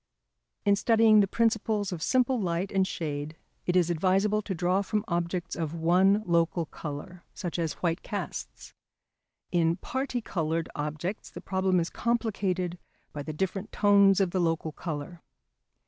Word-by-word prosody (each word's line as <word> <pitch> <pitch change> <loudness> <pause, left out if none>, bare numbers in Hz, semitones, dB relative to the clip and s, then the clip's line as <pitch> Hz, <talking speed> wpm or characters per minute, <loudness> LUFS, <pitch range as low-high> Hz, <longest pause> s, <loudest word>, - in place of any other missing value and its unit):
In 200 0 +5
studying 220 0 +5
the 200 - +4
principles 220 -2 +1
of 175 -3 -5
simple 255 +1 +2
light 175 +1 -1
and 190 -1 +2
shade 150 -2 -4 0.3
it 180 - +1
is 175 -2 +3
advisable 195 +5 +2
to 200 -2 -4
draw 180 +3 +1
from 210 +2 -2
objects 175 0 -2
of 165 -1 -3
one 185 +5 +3
local 170 -1 +1
colour, 155 +4 -8
such 175 -3 -4
as 165 -2 -1
white 170 +1 +1
casts. - - -6 0.8
In 170 -1 +2
parti 260 +5 -3
coloured 165 -6 -2
objects 155 +6 -4
the - - -9
problem 190 -1 +1
is 170 - -2
complicated 195 -7 -1 0.3
by 145 - -4
the 155 - -5
different 190 +6 -3
tones 200 -1 +5
of 190 -3 +2
the 185 - 0
local 165 -1 0
colour. 160 +1 -6
180 Hz, 150 wpm, -28 LUFS, 165-200 Hz, 0.8 s, In